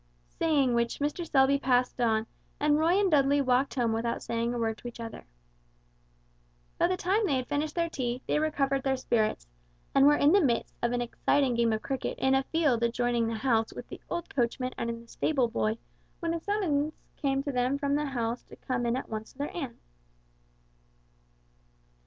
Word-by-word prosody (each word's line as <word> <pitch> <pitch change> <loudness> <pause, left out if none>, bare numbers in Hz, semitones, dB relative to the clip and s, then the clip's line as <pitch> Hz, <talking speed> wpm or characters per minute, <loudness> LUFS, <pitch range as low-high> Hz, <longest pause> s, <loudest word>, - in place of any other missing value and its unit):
Saying 285 -6 +2
which 235 0 0
Mr. 300 +4 -2
Selby 275 0 +4
passed 250 -2 +1
on, 220 -2 +2 0.3
and 295 0 +3
Roy 340 +5 +3
and 395 -3 +2
Dudley 285 -1 +4
walked 265 0 +2
home 235 -3 +1
without 235 +1 -2
saying 235 0 -1
a 240 - -3
word 225 -1 -1
to - - -8
each 240 - -9
other. 230 -1 -7 1.5
By - - +4
the 365 +1 -1
time 390 +5 +1
they 320 -9 +1
had 255 -1 -1
finished 300 +1 -2
their 340 -1 +1
tea, 255 -5 -3
they - - +1
recovered 275 -3 0
their 265 0 0
spirits, 220 - 0 0.5
and 275 +1 +6
were 295 - +6
in 290 +1 +4
the 400 +2 +5
midst 245 -7 0
of 240 - +1
an 245 - 0
exciting 255 +2 +1
game 235 -1 +2
of 220 0 -2
cricket 270 -1 -3
in 265 0 +2
a 270 - +4
field 285 -5 +1
adjoining 235 0 +1
the 225 - -2
house 225 -1 +1
with - - -9
the - - -9
old 345 0 -4
coachman 255 0 -1
and 235 0 -4
the - - -20
stable 265 0 +1
boy, 225 -1 -1 0.4
when 335 -1 -1
a 335 - -2
summons 320 -6 0 0.2
came 275 -1 0
to 285 - -2
them 250 +2 +1
from 280 0 -1
the 295 +1 +1
house 240 -3 -2
to - - -13
come 245 -2 -2
in 235 +2 +1
at - - -5
once 220 0 -6
to - - -28
their 285 +1 -4
aunt. 270 -9 -5
265 Hz, 200 wpm, -29 LUFS, 235-295 Hz, 1.5 s, and